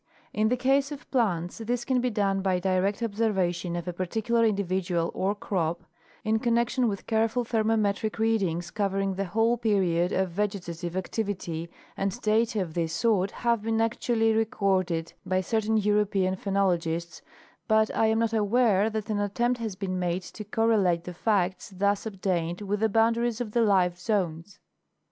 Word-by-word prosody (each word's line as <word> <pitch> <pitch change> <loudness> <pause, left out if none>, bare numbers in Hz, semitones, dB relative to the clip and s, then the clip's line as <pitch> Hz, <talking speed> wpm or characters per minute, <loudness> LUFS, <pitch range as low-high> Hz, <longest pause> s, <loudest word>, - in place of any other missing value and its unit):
In 215 +1 +2
the 250 - +1
case 275 +3 +2
of 290 -1 -8
plants 185 -9 0
this 240 +2 -2
can 255 -2 +1
be 250 - +1
done 195 -3 0
by 190 -1 +1
direct 190 +4 0
observation 190 -6 0
of 175 0 -4
a 180 - -2
particular 220 +6 0
individual 185 -4 0
or 195 +2 0
crop, 170 -5 -2 0.4
in 220 0 +1
con 235 0 +1
nection 240 +1 +1
with 200 -2 -5
careful 225 +2 +1
thermometric 220 -2 0
readings 195 -7 0
covering 195 -1 -1
the 195 +1 -2
whole 225 +5 +1
period 185 -6 +1
of 190 -1 0
vegetative 175 -3 -3
activity, 185 -4 -3 0.3
and 195 +4 -2
data 220 0 +2
of 165 -3 -9
this 165 -1 -1
sort 195 +1 +2
have 235 0 0
been 225 +1 0
actually 225 0 +1
recorded 190 -6 0
by 185 0 0
certain 220 +2 0
European 205 -3 +1
phenologists, 175 -4 -1 0.5
but 220 -1 +3
I 225 - +3
am 220 0 +2
not 230 0 +1
aware 215 -1 +3
that 220 -1 -4
an 205 - 0
attempt 240 +5 0
has 220 -4 -4
been 185 -1 -3
made 180 +1 -1
to 215 - -8
correlate 210 -5 +2
the 180 - -7
facts 185 -1 0
thus 200 +2 0
obtained 180 -3 -2
with 205 0 -2
the 220 +1 +2
boundaries 230 +2 +2
of 235 -4 -4
the 235 - +2
life 185 -5 +3
zones. 180 -2 -2
205 Hz, 165 wpm, -27 LUFS, 185-225 Hz, 0.5 s, but